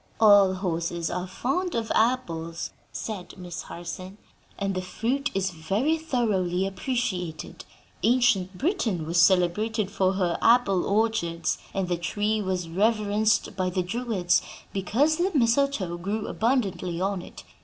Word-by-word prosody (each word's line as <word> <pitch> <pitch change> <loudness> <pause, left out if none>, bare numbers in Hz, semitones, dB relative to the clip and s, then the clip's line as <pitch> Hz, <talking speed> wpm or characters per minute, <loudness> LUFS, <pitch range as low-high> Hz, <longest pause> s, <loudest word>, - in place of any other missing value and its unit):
"All 205 -3 +6
horses 170 -2 -2
are 180 +1 -3
fond 305 - -2
of 225 -1 -2
apples," 170 -9 0 0.2
said 190 -5 -6
Miss 180 -1 -6
Harson, 185 +3 -8 0.4
"and 195 -1 -1
the 185 - -2
fruit 245 +9 -1
is 190 -1 0
very 195 - 0
thoroughly 210 - 0
appreciated. 190 -6 -3 0.4
Ancient 210 -7 +2
Britain 235 - 0
was 170 +2 +3
celebrated 195 +4 +2
for 190 -2 +1
her 180 -3 0
apple 225 -6 +4
orchards, 200 -6 0
and 195 -2 -2
the 175 -1 0
tree 210 +5 -1
was 185 -3 -2
reverenced 210 +3 +1
by 185 -1 0
the 180 0 -1
Druids 205 -2 +1 0.3
because 255 - +1
the 360 +2 +2
mistletoe 235 -7 +2
grew 205 +4 -2
abundantly 200 -8 0
on 195 0 -1
it. - - -11
195 Hz, 135 wpm, -26 LUFS, 180-230 Hz, 0.4 s, All